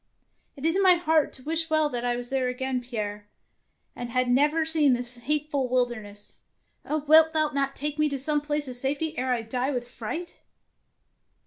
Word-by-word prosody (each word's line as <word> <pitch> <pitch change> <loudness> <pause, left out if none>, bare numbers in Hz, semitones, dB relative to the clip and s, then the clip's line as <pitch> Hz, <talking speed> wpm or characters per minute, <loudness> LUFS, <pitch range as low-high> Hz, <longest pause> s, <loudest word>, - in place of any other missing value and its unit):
'' - - -47
" - - -42
It 280 - -6
is 325 +2 +2
in 390 - +2
my 370 -2 +6
heart 320 -3 +1
to 260 - -13
wish 325 +2 -1
well 310 -1 +2
that 245 -3 -4
I 245 0 0
was 245 +1 -4
there 265 -2 0
again, 255 0 -2
Pierre, 210 -4 -5 0.7
and 240 - -6
had 255 +1 0
never 295 +5 +2
seen 310 -4 +4
this 245 0 +3
hateful 285 +1 -2
wilderness. 220 -5 -2 0.5
Oh, 305 -1 -2
wilt 320 +1 +6
thou 310 -1 +2
not 275 -1 -2
take 295 +1 -4
me 305 0 +3
to 280 - -3
some 295 +2 0
place 295 -1 -2
of 255 - -3
safety 285 +5 -2
ere 255 -1 -1
I 240 -2 0
die 250 +4 -2
with 245 -3 -3
fright 315 +10 -6
275 Hz, 205 wpm, -26 LUFS, 245-305 Hz, 0.7 s, my